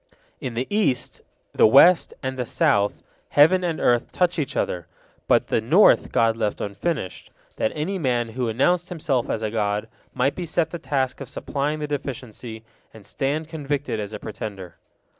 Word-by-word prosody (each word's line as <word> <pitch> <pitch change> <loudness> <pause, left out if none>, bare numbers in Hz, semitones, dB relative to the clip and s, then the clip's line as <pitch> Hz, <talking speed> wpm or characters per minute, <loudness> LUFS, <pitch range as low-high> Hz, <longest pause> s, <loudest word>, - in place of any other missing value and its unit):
In 130 -5 -5
the 125 +3 -1
east, 205 - 0 0.3
the - - +6
west, 165 +9 +6
and 130 0 -2
the 125 -1 -3
south, 100 -1 +1 0.3
heaven 175 +6 +5
and 170 -3 -1
earth 120 -1 +2
touch 180 -1 +1
each 140 - -3
other, 90 -2 -2 0.4
but - - +4
the - - +1
north 165 - +5
God 115 -1 +3
left 110 -2 -2
unfinished, 100 - -4 0.3
that - - 0
any 180 +6 -2
man 120 -6 0
who 120 +1 -2
announced 175 +10 +1
himself 150 -8 -1
as 110 - -2
a 110 - -1
god 105 -2 -1 0.2
might 140 - +1
be 175 -2 -5
set 160 +1 0
the 170 - -5
task 135 -3 -1
of 135 - -7
supplying 145 +3 -2
the 150 -1 -4
deficiency, 125 -5 -6 0.3
and 110 -3 -15
stand 145 +8 -2
convicted 145 -6 -3
as 105 -1 -5
a 105 - -5
pretender. 100 -4 -7
130 Hz, 175 wpm, -23 LUFS, 110-155 Hz, 0.4 s, the